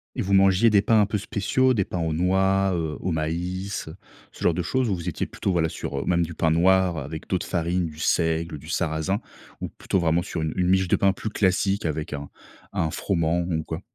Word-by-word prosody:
Et - - -1
vous 100 - -1
mangiez 95 +3 +5
des 105 -2 +4
pains 110 +2 +3
un 105 - +5
peu 105 +1 -1
spéciaux, 110 +6 +1
des 100 -6 +1
pains 90 - -4
aux 80 -1 -1
noix, 95 +3 +2
heu, 80 -3 -2
au 90 - -2
maïs, 90 +5 -3
heu, 80 - -8 0.4
ce - - -9
genre 85 - +4
de 90 - -1
choses? 125 +7 0
Où 100 - +1
vous 85 0 -7
étiez 85 - -2
plutôt 95 - -2
voilà 80 -2 +1
sur, - - -4
heu, - - -3
même 85 -1 +2
du 85 0 -5
pain 80 0 +1
noir 90 +1 +3
avec 80 +2 -6
d'autres 95 - -1
farines, 85 0 0
du 80 -1 -8
seigle, 80 0 0
du 75 - -13
sarrasin, 85 +5 -1 0.4
ou - - -3
plutôt 95 - -2
vraiment 85 0 +2
sur 85 -2 -4
une 80 0 -1
une 90 - +2
miche 95 0 +2
de - - +3
pain 95 -1 +3
plus 110 - -5
classique 100 0 +1
avec 80 0 -2
un 70 -1 -5 0.4
un 80 -1 0
froment, 85 -2 0
ou 85 -2 -2
quoi? 80 +2 -5
90 Hz, 235 wpm, -24 LUFS, 80-95 Hz, 0.4 s, mangiez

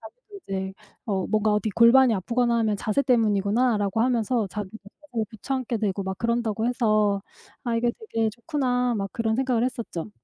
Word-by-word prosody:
자기도 440 -5 -13
이제 190 0 -3 0.3
어 190 -4 -1
뭔가 215 0 +1
어디 210 +1 0
골반이 235 +3 +6
아프거나 235 +4 +1
하면 215 -2 +1
'자세 215 +6 0
때문이구나.'라고 215 -2 +2
하면서 235 -2 +1
자기들도 205 +1 -7 0.4
고쳐 235 +4 -4
앉게 250 -3 -2
되고 200 -2 -1
막 190 0 -4
그런다고 230 -1 0
해서 215 -5 +2 0.4
'아 235 -2 -1
이게 235 +1 +2
되게 225 - -1
좋구나.' 250 -1 -1
막 195 -1 -2
그런 225 -1 0
생각을 250 -2 +1
했었죠. 230 - -4
225 Hz, 380 characters per minute, -25 LUFS, 205-245 Hz, 0.4 s, 골반이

